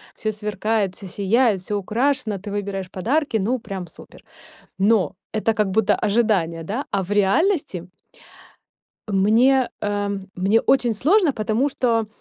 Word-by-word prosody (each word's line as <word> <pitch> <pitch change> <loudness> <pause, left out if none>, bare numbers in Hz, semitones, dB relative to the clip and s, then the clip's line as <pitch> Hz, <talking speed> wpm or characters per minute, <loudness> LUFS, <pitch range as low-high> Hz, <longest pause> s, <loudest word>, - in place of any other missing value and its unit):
всё 215 - -2
сверкает, 210 -1 -1
всё 195 - -9
сияет, 205 +2 +1
всё 205 +3 -4
украшено, 230 +2 0
ты 200 +2 -8
выбираешь 200 -2 -4
подарки. 240 - 0
Ну, 230 +5 0
прям 195 -5 -6
супер! 160 - -15 0.5
Но 200 0 +2 0.2
это 220 +1 +1
как 210 -2 0
будто 210 +1 +2
ожидание, 200 -7 0
да? 220 - -4
А 200 - +1
в 185 - -8
реальности 205 - +1 1.2
мне, 235 +7 +4
эм, 205 -1 -2
мне 195 +5 +2
очень 245 -3 +2
сложно, 325 - +3
потому 220 +4 0
что 230 -5 0
210 Hz, 140 wpm, -22 LUFS, 195-235 Hz, 1.2 s, мне